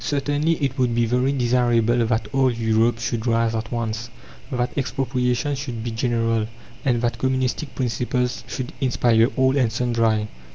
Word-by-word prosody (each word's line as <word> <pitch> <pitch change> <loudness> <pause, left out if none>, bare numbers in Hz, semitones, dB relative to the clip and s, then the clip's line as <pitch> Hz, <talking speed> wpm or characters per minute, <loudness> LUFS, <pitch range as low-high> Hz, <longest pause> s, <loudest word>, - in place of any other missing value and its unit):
Certainly 145 +3 +1
it 140 -3 -2
would 125 -2 +2
be 120 0 +3
very 125 +3 +1
desirable 120 -2 +2
that 110 -2 0
all 135 -1 +3
Europe 115 0 +2
should 115 0 -2
rise 115 -1 +2
at 110 0 -3
once, 115 -1 -3 0.4
that 125 -1 -1
expropriation 130 0 0
should 130 -5 -5
be 120 - -3
general, 115 -1 0 0.4
and 125 -5 +2
that 120 - -1
communistic 130 +2 -1
principles 125 0 -1
should 125 -2 -5
inspire 120 -3 +3
all 130 +1 +3
and 125 -5 +2
sundry. 115 -3 +1
120 Hz, 155 wpm, -22 LUFS, 115-130 Hz, 0.4 s, be